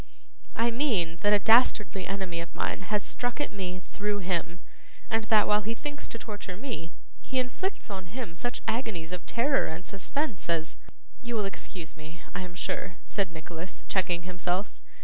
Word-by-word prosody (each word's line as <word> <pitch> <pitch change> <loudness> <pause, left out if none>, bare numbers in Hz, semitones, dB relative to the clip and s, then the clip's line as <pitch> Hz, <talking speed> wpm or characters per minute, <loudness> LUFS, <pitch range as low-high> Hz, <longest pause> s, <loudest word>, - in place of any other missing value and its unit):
'I 235 +1 +4
mean 215 - +2
that 205 - +5
a 210 - +8
dastardly 210 -3 +5
enemy 190 -3 -1
of 170 - -8
mine - - 0
has 210 -1 +2
struck 245 +2 -2
at 290 - 0
me 185 -2 -2
through 205 +2 -1
him, 175 -2 0 0.5
and 225 0 +3
that 215 -2 +6
while 210 0 +5
he 225 +3 -2
thinks 290 +3 -4
to - - -5
torture 205 -5 -5
me, 215 - -4 0.3
he 265 - -2
inflicts 255 - -1
on 190 -2 -4
him 220 -2 -4
such 245 +8 -2
agonies 215 -9 0
of 180 -1 -3
terror 270 +4 +3
and 165 +3 -5
suspense 215 - -2
as 165 -1 +1 0.4
You 240 -1 -2
will 210 -2 +2
excuse 180 -3 -5
me, 160 +2 -10
I - - -2
am 180 -1 -6
sure,' 175 +1 -2
said 195 -4 +1
Nicholas, 165 +2 -6
checking 175 -2 +2
himself. 180 +2 -1
195 Hz, 175 wpm, -30 LUFS, 175-230 Hz, 0.5 s, a